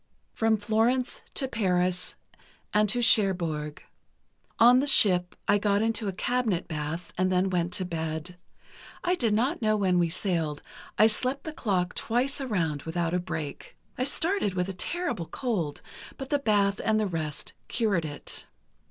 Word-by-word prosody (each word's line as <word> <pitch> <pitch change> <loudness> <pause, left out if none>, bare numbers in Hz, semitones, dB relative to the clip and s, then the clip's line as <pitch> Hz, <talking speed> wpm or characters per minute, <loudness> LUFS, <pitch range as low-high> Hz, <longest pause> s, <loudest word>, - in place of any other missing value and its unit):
"From 225 0 +2
Florence 225 +5 0
to 265 - +1
Paris, 180 -6 0 0.6
and 210 0 +3
to 240 +3 +1
Cherbourg. 170 -10 +2 0.7
On 245 +2 +7
the 280 - 0
ship, 180 -9 +5
I 205 - +4
got 205 0 +2
into 225 -1 0
a - - 0
cabinet 220 -2 -1
bath, 160 +2 -5
and 185 0 +2
then 185 +1 +2
went 175 -1 0
to 185 - -1
bed. 160 0 -4 0.7
I 355 - +2
did 240 -11 +1
not 260 +9 0
know 215 -1 +2
when 185 -3 +2
we 170 -1 +2
sailed, 165 -4 -1 0.3
and 210 - +6
I - - +8
slept 255 +5 +1
the 315 - -6
clock 185 -9 -1
twice 255 +5 0
around 170 - -1
without 165 +1 -2
a 180 - +2
break. 155 -5 -6 0.2
I 250 - -1
started 320 - 0
with 180 0 0
a - - -3
terrible 245 - -2
cold, 190 - -3 0.3
but 270 -1 -7
the 290 - +2
bath 205 -5 +2
and 215 0 +2
the 215 - +1
rest 160 -6 -4
cured 210 -8 +1
it. 145 -2 -6
200 Hz, 165 wpm, -27 LUFS, 175-235 Hz, 0.7 s, I